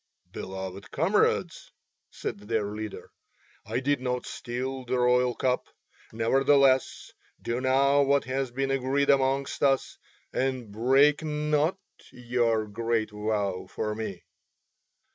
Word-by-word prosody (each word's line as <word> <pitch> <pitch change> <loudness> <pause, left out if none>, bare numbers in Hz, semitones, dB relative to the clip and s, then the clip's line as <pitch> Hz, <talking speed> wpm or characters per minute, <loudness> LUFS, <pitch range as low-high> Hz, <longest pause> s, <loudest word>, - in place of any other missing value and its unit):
"Beloved 95 0 -7
comrades," 175 +1 0 0.4
said - - -5
their 105 0 -2
leader, 105 0 -7 0.6
"I - - -1
did 140 0 0
not 125 -1 -2
steal 130 +2 -5
the 125 +1 -1
royal 125 0 +3
cup. 125 -1 0 0.4
Nevertheless 130 +3 +2 0.3
do 120 +2 -3
now 135 +2 +3
what 140 0 +3
has 130 0 -2
been 135 +2 -2
agreed 135 +2 +2
amongst 135 0 +1
us, 135 -1 +1 0.3
and 130 -4 -2
break 135 +8 +4
not 150 +2 0 0.3
your 120 -3 0
great 110 +1 -1
vow 105 -3 -2
for 105 -1 -3
me." 105 -4 -6
125 Hz, 115 wpm, -27 LUFS, 110-135 Hz, 0.6 s, break